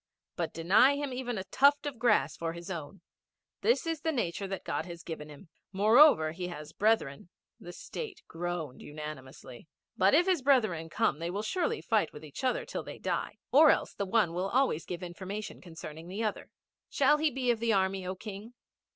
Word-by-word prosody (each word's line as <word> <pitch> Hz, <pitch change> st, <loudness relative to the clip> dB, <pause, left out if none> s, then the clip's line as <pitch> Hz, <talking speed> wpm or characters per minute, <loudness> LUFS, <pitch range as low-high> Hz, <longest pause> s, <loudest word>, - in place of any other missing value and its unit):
But 165 Hz, -3 st, -2 dB
deny 205 Hz, +12 st, +4 dB
him 285 Hz, -2 st, -3 dB
even 245 Hz, -2 st, -3 dB
a 190 Hz, -, -3 dB
tuft 280 Hz, +9 st, +3 dB
of 280 Hz, -5 st, -5 dB
grass 210 Hz, -, +3 dB
for 165 Hz, -1 st, -3 dB
his 170 Hz, +2 st, -8 dB
own. 170 Hz, +2 st, -7 dB, 0.6 s
This 470 Hz, -5 st, +2 dB
is 325 Hz, -3 st, -2 dB
the 320 Hz, -, 0 dB
nature 200 Hz, -, -2 dB
that 195 Hz, 0 st, -5 dB
God -, -, -2 dB
has 170 Hz, -1 st, -9 dB
given 155 Hz, -2 st, -7 dB
him. 150 Hz, +4 st, -13 dB, 0.2 s
Moreover 210 Hz, -, +6 dB
he 180 Hz, +2 st, -5 dB
has 155 Hz, -3 st, -8 dB
brethren 200 Hz, -9 st, 0 dB, 0.2 s
' -, -, -59 dB
The 175 Hz, -, -9 dB
State 400 Hz, -, -7 dB
groaned 170 Hz, -4 st, -5 dB
unanimously. 145 Hz, -3 st, -9 dB, 0.3 s
'But 190 Hz, +5 st, +4 dB
if 345 Hz, +3 st, +5 dB
his 370 Hz, -6 st, +2 dB
brethren 215 Hz, -, +2 dB
come, 150 Hz, -, 0 dB
they 170 Hz, +1 st, -3 dB
will 200 Hz, +4 st, -3 dB
surely 370 Hz, -, -1 dB
fight -, -, +1 dB
with -, -, -10 dB
each -, -, -9 dB
other -, -, 0 dB
till -, -, -4 dB
they -, -, -9 dB
die; -, -, -3 dB
or 300 Hz, +3 st, +8 dB
else -, -, +2 dB
the 200 Hz, -, -3 dB
one 190 Hz, -5 st, +2 dB
will 185 Hz, +3 st, -1 dB
always 255 Hz, -, +1 dB
give 175 Hz, 0 st, -5 dB
information 190 Hz, +4 st, -6 dB
concerning 165 Hz, -2 st, -9 dB
the 200 Hz, +5 st, -4 dB
other. 215 Hz, -, -3 dB, 0.4 s
Shall 300 Hz, -, +3 dB
he 310 Hz, 0 st, +3 dB
be 255 Hz, -2 st, 0 dB
of 230 Hz, -, -1 dB
thy 230 Hz, 0 st, +1 dB
Army, 190 Hz, -1 st, +1 dB
O 185 Hz, -, -3 dB
King? 210 Hz, +4 st, -9 dB
195 Hz, 200 wpm, -30 LUFS, 170-255 Hz, 0.6 s, or